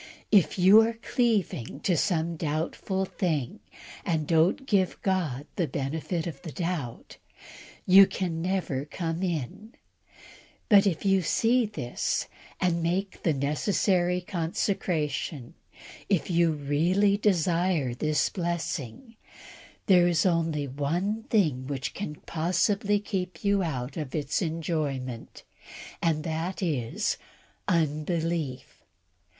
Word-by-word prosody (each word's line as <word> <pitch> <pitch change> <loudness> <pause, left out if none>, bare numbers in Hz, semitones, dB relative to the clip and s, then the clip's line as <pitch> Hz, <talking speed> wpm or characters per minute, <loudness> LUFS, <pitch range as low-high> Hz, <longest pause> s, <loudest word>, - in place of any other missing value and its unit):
If 200 -3 +4
yon 205 +5 +7
are 230 - -2
cleaving 215 - -1
to 180 - +1
some 170 -1 0
doubtful 165 +5 -2
thing, 160 - -2 0.4
and 160 -3 0
don't 165 - +2
give 195 -7 +1
God 160 -8 -1
the 175 -4 +1
benefit 155 +5 -3
of 155 -6 -6
the 160 - -7
doubt, 165 -8 -4 0.7
you 195 +1 +8
can 170 -3 -3
never 180 -7 -1
come 165 +2 -4
in; 180 - -4 0.9
but, 205 -2 +7
if 180 0 -1
you 195 -1 +4
see 230 +7 +2
this, 125 - -2 0.3
and 170 -2 +1
make 185 +4 -2
the 165 - +2
necessary 175 +5 +1
consecration, 165 - -2 0.6
if 190 -2 +1
you 170 -1 +3
really 165 +8 +2
desire 175 - +1
this 150 +3 +1
blessing, 170 - -4 0.7
there 180 -3 +5
is 170 0 +2
only 165 -5 +1
one 175 - -2
thing 150 - +1
which 135 -2 -3
can 175 -7 -5
possibly 200 +5 +1
keep 180 -4 -4
you 200 -1 +3
out 135 -6 -3
of 150 -3 -4
its 150 +2 -1
enjoyment, 150 -7 -3 0.6
and 160 -2 +1
that 165 +4 -3
is 130 -10 -1 0.5
unbelief. 160 -3 -1
170 Hz, 115 wpm, -27 LUFS, 150-190 Hz, 0.9 s, you